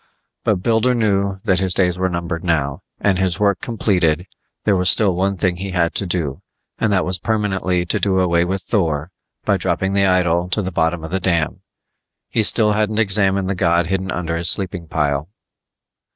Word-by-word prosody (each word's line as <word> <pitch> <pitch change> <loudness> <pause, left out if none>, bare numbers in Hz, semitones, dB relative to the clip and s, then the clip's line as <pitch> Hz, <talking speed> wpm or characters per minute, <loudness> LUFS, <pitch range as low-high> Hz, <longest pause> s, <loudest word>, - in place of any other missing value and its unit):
But 95 -4 0
Builder 115 +3 +2
knew 100 -4 +1
that 95 -5 +2
his 95 -2 0
days 90 -2 +2
were 95 0 0
numbered 85 -1 -4
now, 75 -5 -1 0.2
and 95 -2 +1
his 95 -2 0
work 100 -2 +2
completed; 90 -8 0 0.4
there 105 - +3
was 90 0 +3
still 100 -4 +4
one 95 +2 0
thing 90 -2 0
he 95 +2 -5
had 90 -3 0
to 100 - -3
do, 80 -6 -2 0.4
and 110 - +1
that 95 -2 +2
was 90 0 -2
permanently 95 -4 0
to 85 - -1
do 95 -2 +1
away 85 -2 +2
with 95 +1 -2
Thor 80 -5 -1 0.3
by - - +2
dropping 95 +1 -1
the 100 -1 +3
idol 90 -1 +2
to 105 +3 0
the 95 - -3
bottom 80 0 0
of 80 - -7
the 95 - 0
dam; 85 -4 0 0.7
he - - +1
still 105 0 +3
hadn't 105 0 0
examined 100 -3 +2
the 100 - 0
god 85 -1 +2
hidden 95 +2 -2
under 85 -2 -2
his 85 0 +1
sleeping 90 -2 0
pile. 75 0 -1
95 Hz, 195 wpm, -19 LUFS, 85-100 Hz, 0.7 s, still